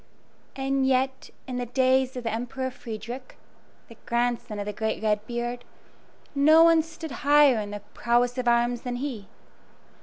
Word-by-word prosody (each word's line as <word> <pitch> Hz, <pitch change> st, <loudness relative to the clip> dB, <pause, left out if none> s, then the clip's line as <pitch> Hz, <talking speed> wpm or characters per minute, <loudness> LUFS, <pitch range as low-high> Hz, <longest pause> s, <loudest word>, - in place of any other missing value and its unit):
And 270 Hz, 0 st, 0 dB
yet, 265 Hz, 0 st, 0 dB, 0.2 s
in 255 Hz, -1 st, -5 dB
the 245 Hz, -1 st, -3 dB
days 260 Hz, +1 st, +2 dB
of 250 Hz, -, -5 dB
the 230 Hz, -, -2 dB
Emperor 250 Hz, +3 st, -3 dB
Frederick 235 Hz, +2 st, -8 dB, 0.5 s
the 230 Hz, -, -14 dB
grandson 235 Hz, -2 st, -1 dB
of 205 Hz, -, -4 dB
the 210 Hz, -, -4 dB
great 220 Hz, +1 st, -3 dB
Red 210 Hz, -1 st, +1 dB
beard 240 Hz, 0 st, -4 dB, 0.7 s
no 310 Hz, +3 st, +6 dB
one 330 Hz, -1 st, +6 dB
stood 325 Hz, -1 st, -9 dB
higher 285 Hz, -3 st, +5 dB
in 205 Hz, -1 st, -4 dB
the 205 Hz, 0 st, -6 dB
prowess 240 Hz, +1 st, +1 dB
of 250 Hz, -, -2 dB
arms 240 Hz, 0 st, +2 dB
than 245 Hz, -1 st, -4 dB
he. 245 Hz, -6 st, -5 dB
245 Hz, 160 wpm, -26 LUFS, 235-265 Hz, 0.7 s, no